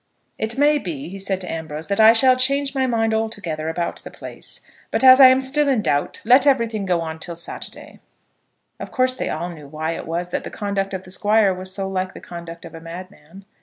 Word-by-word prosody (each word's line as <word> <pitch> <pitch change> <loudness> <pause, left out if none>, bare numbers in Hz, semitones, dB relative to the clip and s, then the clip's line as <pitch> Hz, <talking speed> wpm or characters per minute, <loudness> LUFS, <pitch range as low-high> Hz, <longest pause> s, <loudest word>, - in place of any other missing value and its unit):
"It 220 +3 -2
may 295 +1 +4
be," 170 - -6
said 190 -1 -2
he - - -7
to - - -4
Ambrose, 160 -1 -6
"that 200 +3 -2
I 220 0 +9
shall 255 +3 +5
change 275 +2 +1
my 265 -2 +1
mind 225 -2 +1
altogether 200 -8 -3
about 170 +1 -3
the - - -10
place; - - -9 0.3
but - - -1
as 260 0 +9
I 265 - +11
am 260 +1 +5
still 285 +3 +1
in 245 -6 +1
doubt, 145 -6 -1
let 255 +4 +6
everything 230 -7 +1
go 175 -2 +1
on 160 -1 -5
till 170 +1 -5
Saturday." 170 - -6 0.8
Of - - -6
course 255 0 +2
they 255 - -4
all 170 +3 -3
knew 150 -4 -11
why 155 +2 -3
it 165 - -6
was 170 +2 -3
that - - -3
the - - -6
conduct 200 -2 -3
of 185 - -6
the 185 - -12
Squire 205 0 +3
was 185 +1 -7
so 195 0 -3
like 185 -1 -3
the - - -8
conduct 170 -1 -9
of 170 - -11
a 165 - -9
madman. 180 +1 -11
195 Hz, 230 wpm, -21 LUFS, 170-240 Hz, 0.8 s, I